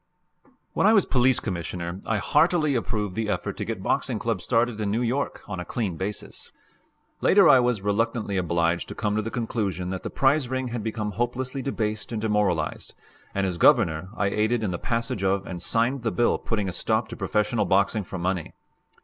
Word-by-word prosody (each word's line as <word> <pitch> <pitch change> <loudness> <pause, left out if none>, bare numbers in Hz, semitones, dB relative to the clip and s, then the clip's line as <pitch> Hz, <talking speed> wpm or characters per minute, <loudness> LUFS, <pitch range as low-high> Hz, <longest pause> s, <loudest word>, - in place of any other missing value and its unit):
When - - +3
I 220 - +6
was 200 -4 +5
Police 130 -1 +3
Commissioner, 85 -1 -4
I 110 - +1
heartily 155 - +2
approved 105 -5 -2
the 110 0 -2
effort 95 -4 -2
to - - -3
get - - -4
boxing - - 0
clubs - - -2
started 115 -1 +1
in 105 - -1
New 115 +4 0
York 130 +4 -2
on 105 -3 -5
a - - -3
clean 100 -3 -3
basis. 95 +5 -6 0.7
Later 195 -3 +6
I 130 - +8
was 120 -5 +1
reluctantly 105 0 0
obliged 85 -1 0
to - - -7
come 105 -2 -1
to 110 - +1
the 110 - -4
conclusion 105 -7 -2
that 95 - -4
the - - -5
prize 135 -1 +2
ring 130 -1 -2
had 120 -1 -3
become 110 -1 -3
hopelessly 125 +5 -2
debased 110 -6 -3
and 115 - -2
demoralized, 105 -7 -1 0.4
and 100 0 +1
as 90 -2 -3
Governor 95 - +4
I 100 - +1
aided 110 +3 +1
in 100 - -1
the 85 - -3
passage 115 -4 -2
of 95 0 +1
and 90 -2 -6
signed 120 +7 +1
the 115 - 0
bill 120 - +2
putting 105 -4 -2
a 90 - -3
stop 110 +4 0
to - - -6
professional 105 +1 0
boxing 100 +2 +2
for 95 - -7
money. 90 -1 -2
110 Hz, 200 wpm, -25 LUFS, 95-120 Hz, 0.7 s, I